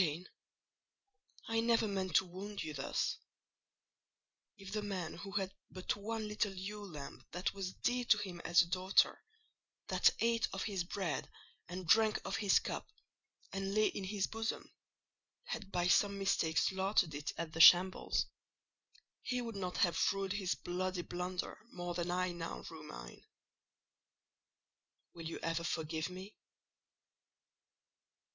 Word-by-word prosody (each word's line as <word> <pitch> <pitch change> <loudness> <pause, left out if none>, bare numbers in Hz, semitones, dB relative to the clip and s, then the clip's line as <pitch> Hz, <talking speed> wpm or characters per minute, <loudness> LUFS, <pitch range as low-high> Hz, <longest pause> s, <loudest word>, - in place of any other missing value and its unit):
"Jane, 170 +1 -1 1.2
I 225 0 +1
never 230 -1 +3
meant 190 -4 -2
to 190 - +6
wound 195 +3 -6
you 155 - -5
thus. 135 -1 -1 1.4
If 195 -1 -9
the 215 - 0
man 190 -5 -3
who 195 0 -8
had 195 -2 0 0.2
but 185 -1 -2
one 215 +1 -3
little 210 -2 -1
ewe 205 +3 -5
lamb 150 -7 -8
that 180 +2 -1
was 190 -1 -4
dear 245 0 0
to 215 - +6
him 190 -4 -5
as 175 0 +6
a 170 - -8
daughter, 185 +2 +3 0.7
that - - +6
ate 230 0 +2
of 195 - -2
his 195 -5 -1
bread 180 -4 -2 0.4
and 180 +1 -5
drank 215 +5 +5
of 195 - -1
his 205 -3 +4
cup, - - -3 0.7
and 195 +1 -2
lay 215 0 +4
in 195 - -5
his 195 0 0
bosom, 225 0 -4 0.7
had 220 - -5
by 175 -2 +1
some 200 +2 +4
mistake 180 -5 +1
slaughtered 190 -3 +2
it 145 +1 -3
at 165 -1 -4
the 160 - +2
shambles, 185 +3 +7 1.0
he 250 -1 -1
would 230 -3 -4
not 185 -2 -3
have 170 -2 +3
rued 195 -1 -2
his 195 -3 0
bloody 180 0 -2
blunder 180 +1 -4
more 175 0 -4
than 175 0 -2
I 180 0 +1
now 170 -1 -5
rue - - -9
mine. - - -10 1.9
Will 165 -1 -6
you - - -5
ever 165 0 0
forgive 160 0 -2
me?" 185 +3 -9
190 Hz, 145 wpm, -35 LUFS, 175-205 Hz, 1.9 s, shambles